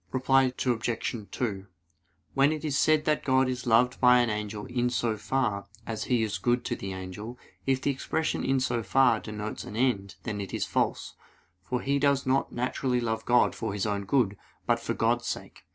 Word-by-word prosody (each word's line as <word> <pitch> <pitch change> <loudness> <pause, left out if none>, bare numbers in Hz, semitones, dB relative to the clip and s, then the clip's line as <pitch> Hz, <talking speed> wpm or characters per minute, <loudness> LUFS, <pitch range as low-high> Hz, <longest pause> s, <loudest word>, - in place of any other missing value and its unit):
Reply 130 0 +3
Obj. 115 -2 -1
2: 100 -5 -3 0.7
When 140 +2 +4
it 155 0 -3
is 145 -3 -1
said 155 +1 +3
that 155 -1 +1
God 130 -1 +3
is 125 -1 -3
loved 125 +2 +3
by 125 -1 +7
an 120 -2 +2
angel 105 0 -4
"in 125 -1 0
so 120 -2 0
far" 105 -3 -1 0.2
as 110 -1 -4
He 120 -3 +2
is 110 -1 -2
good 120 0 +1
to - - -1
the 95 - -6
angel, 95 +6 -7 0.3
if 135 0 +1
the 140 - +2
expression 160 +4 -2
"in 135 0 +2
so 120 -2 0
far" 115 +2 +3
denotes 105 0 -6
an - - -8
end, 110 -6 0
then 105 -3 -3
it 100 - -5
is - - -1
false; - - -1 0.5
for 125 +6 -3
he 140 +1 +1
does 140 -1 +2
not 130 +1 +1
naturally 125 +1 -1
love 115 -2 -2
God 120 0 +4
for 110 -3 -4
his 100 0 -1
own 100 -1 -1
good, 105 -3 +1 0.3
but - - +2
for - - -3
God's - - +1
sake. - - -6
120 Hz, 200 wpm, -28 LUFS, 105-130 Hz, 0.7 s, by